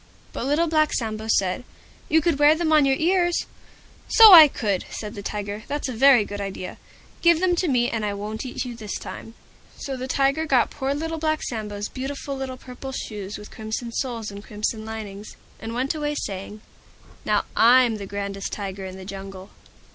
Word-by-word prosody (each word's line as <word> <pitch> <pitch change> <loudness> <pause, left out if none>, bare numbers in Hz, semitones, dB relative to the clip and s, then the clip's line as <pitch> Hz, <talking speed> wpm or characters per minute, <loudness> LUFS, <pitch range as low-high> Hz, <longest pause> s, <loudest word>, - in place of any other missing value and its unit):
But 245 - -3
Little 300 +4 +2
Black 310 -2 +2
Sambo 220 -2 -3
said, 190 0 +1 0.5
"You 320 +1 +4
could 310 -2 0
wear 295 +1 +6
them 320 -1 0
on 300 -2 +6
your 270 - +3
ears." 350 +2 +1 0.6
"So 445 -4 +9
I 320 -3 +12
could," 205 -8 -2
said 210 -1 -6
the 200 - -7
Tiger: 205 0 -4
"that's 290 0 -3
a 255 - -4
very 245 -2 +5
good 205 0 -6
idea. 190 -2 -6 0.4
Give 340 -1 +5
them 360 -1 +2
to 360 - +1
me, 245 -4 +2
and 225 -3 -2
I 205 -1 -2
won't 210 +2 -5
eat 255 0 -4
you 245 -1 -6
this 215 -3 -6
time." 225 - -9 0.4
So 270 - -5
the 255 0 -5
Tiger 275 +4 +1
got 260 -5 +3
poor 270 +1 -2
Little 325 +2 -3
Black 310 0 0
Sambo's 210 -3 -4
beautiful 275 +1 -5
little 265 -1 -5
Purple 260 +1 -9
Shoes 205 -5 -6
with 210 - -12
Crimson 220 +2 -5
Soles 230 -4 -3
and 200 0 -9
Crimson 215 +1 -3
Linings, 215 -2 -7 0.2
and 225 +1 -6
went 260 +4 0
away 295 -1 -2
saying, 205 -3 -5 0.6
"Now - - +1
I'm 240 -1 +5
the 200 -1 -7
grandest 200 0 -4
Tiger 195 -1 -5
in 185 0 -9
the 190 - -10
Jungle." 195 0 -9
235 Hz, 195 wpm, -24 LUFS, 205-285 Hz, 0.6 s, I